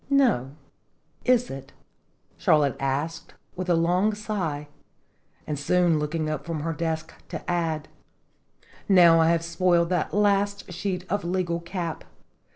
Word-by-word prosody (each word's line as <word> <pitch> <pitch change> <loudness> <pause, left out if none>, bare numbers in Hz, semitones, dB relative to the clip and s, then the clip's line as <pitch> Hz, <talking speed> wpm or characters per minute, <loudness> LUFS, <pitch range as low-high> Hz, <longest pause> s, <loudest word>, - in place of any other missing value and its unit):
" - - -33
No, 230 - +2 0.7
is 250 -1 +3
it?" 135 0 -9 0.6
Charlotte 145 -5 +3
answered, 140 +4 -3 0.2
with 185 0 -4
a 175 - +4
long 180 +6 +2
sigh, 180 -9 -3 0.8
and 150 -2 -3
soon 170 +1 +2
looking 155 +1 -2
up 155 -2 -3
from 160 -1 -4
her 165 +2 -2
desk 160 0 -3 0.2
to - - -7
add: 165 -3 -1 1.0
"Now 170 -4 +7
I 160 - +4
have 170 -1 +2
spoiled 170 0 +2
that 180 -3 0 0.6
sheet 180 0 -3
of 205 +2 -1
legal 175 -1 -1
cap! 170 -1 -5
170 Hz, 135 wpm, -25 LUFS, 155-180 Hz, 1.0 s, Now